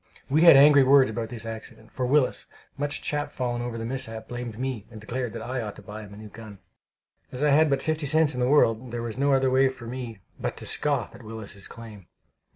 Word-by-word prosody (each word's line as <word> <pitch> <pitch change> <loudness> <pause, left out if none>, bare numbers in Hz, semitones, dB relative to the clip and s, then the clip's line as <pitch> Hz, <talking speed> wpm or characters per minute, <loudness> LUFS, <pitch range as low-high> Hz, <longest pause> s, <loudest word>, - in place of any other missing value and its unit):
We 155 +3 +3
had 165 -5 +9
angry 145 0 +7
words 135 -2 +5
about 115 0 -4
this 115 -2 -5
accident, 110 0 -9
for 125 - -2
Willis, 140 0 +1 0.3
much 145 +1 -3
chapfallen 125 -5 -2
over 120 -1 -4
the 115 - -4
mishap, 115 -3 -5
blamed 120 -2 -6
me, 125 -4 -4
and 110 -2 -11
declared 120 +2 -4
that 115 -1 -6
I 125 +2 -3
ought 105 -2 -6
to 105 - -13
buy 105 +1 -8
him 105 -2 -12
a 100 - -11
new 110 0 -10
gun. 110 -1 -11 0.7
As 130 +3 -4
I 150 - +4
had 155 +2 +5
but 135 -1 0
fifty 155 -2 -1
cents 155 0 +3
in 125 - -4
the 125 0 +1
world, 125 -4 +3
there 120 0 -4
was 120 +1 -5
no 140 0 +3
other 135 -1 +2
way 130 +1 +4
for 130 -2 -10
me 120 -2 -6 0.2
but - - -3
to - - -7
scoff 140 -6 -1
at - - -13
Willis's 110 -3 -6
claim. 110 -5 -12
125 Hz, 235 wpm, -26 LUFS, 110-135 Hz, 0.7 s, had